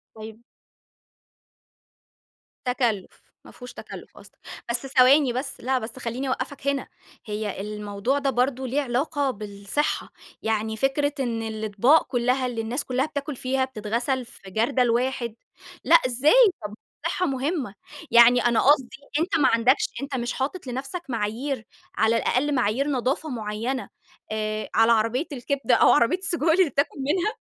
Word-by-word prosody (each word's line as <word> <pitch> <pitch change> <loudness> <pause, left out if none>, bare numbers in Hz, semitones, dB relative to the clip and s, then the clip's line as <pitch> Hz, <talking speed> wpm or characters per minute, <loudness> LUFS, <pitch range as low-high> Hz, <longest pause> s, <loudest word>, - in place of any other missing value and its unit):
طيب 220 +1 -10 2.2
تكلُّف، 240 -6 -1 0.2
ما - - -13
فيهوش 250 0 -11
تكلُّف - - -11
قصدك، - - -16 0.3
بس 235 +3 -2
ثواني 265 0 +5
بس 265 +2 -4
لا 260 +1 0
بس 225 +3 -7
خلّيني 250 +3 -4
أوقفك 265 +2 -4
هنا، 280 -2 0 0.4
هي 210 -2 -4
الموضوع 210 +5 -2
ده 275 -1 0
برضو 260 0 0
ليه 265 +4 0
علاقة 275 +2 -1
بالصحة، 205 +5 -3 0.3
يعني 220 0 -1
فكرة 280 +3 +1
إن 235 -4 -1
الإطباق 220 +6 +2
كلّها 250 +1 +1
اللي 240 -2 -2
الناس 240 +6 -2
كلّها 255 +2 0
بتاكل 290 -1 -5
فيها 260 +1 0
بتتغسل 240 +2 -2
في 200 -5 -14
جردل 240 +4 +1
واحد، 240 -1 -1 0.5
لأ 335 - +6
إزاي 265 -2 +3 0.3
طب 210 - -6 0.3
الصحة 365 - 0
مهمة، 270 - -2 0.4
يعني 235 +1 +7
أنا 235 -1 +3
قصدي 270 -3 +3 0.2
أنتَ 330 0 +1
ما 275 -4 +4
عندكش 240 +4 +3
أنتَ 275 -1 -4
مش 240 -1 -2
حاطط 280 +4 -4
لنفسك 270 +8 -5
معايير، 230 +3 -3 0.3
على 225 +1 +3
الأقل 280 +5 +1
معايير 250 +4 +1
نضافة 275 +3 -1
معينة، 230 +2 -3 0.4
آآ، 215 0 -3
على 225 +1 +5
عربية 230 +7 +1
الكبدة 275 +2 0
أو - - +5
عربية 360 - +3
السجق 370 -5 -2
اللي 330 0 +4
بتاكل 280 +2 -1
منها؟ 345 +10 0
255 Hz, 145 wpm, -24 LUFS, 225-275 Hz, 2.2 s, يعني